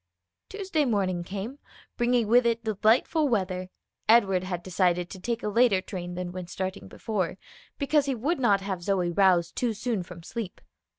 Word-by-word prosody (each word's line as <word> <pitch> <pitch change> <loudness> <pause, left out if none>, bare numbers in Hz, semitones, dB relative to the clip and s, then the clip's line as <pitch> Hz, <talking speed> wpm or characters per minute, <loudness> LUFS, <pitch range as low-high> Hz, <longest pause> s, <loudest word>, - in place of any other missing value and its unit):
Tuesday 385 -6 -1
morning 195 -8 0
came, 205 +9 -6 0.4
bringing 240 -2 +2
with 245 +3 +5
it 230 0 0
delightful 225 - +2
weather; 185 -4 -1 0.4
Edward 195 -5 +5
had 180 -2 -4
decided 180 -1 +1
to 190 - -8
take 230 +4 -3
a - - -1
later 210 -2 +4
train 180 -2 -6
than 180 0 -4
when 180 -1 -6
starting 190 +2 -4
before, 190 -6 -3 0.4
because 285 0 +2
he 270 - 0
would 285 +9 -1
not 205 -6 +3
have 190 -2 -4
Zoe 180 -2 0
roused 175 -2 +3
too 240 -3 0
soon 225 -1 -1
from 175 -1 -10
sleep. 220 0 -6
200 Hz, 170 wpm, -27 LUFS, 180-240 Hz, 0.4 s, with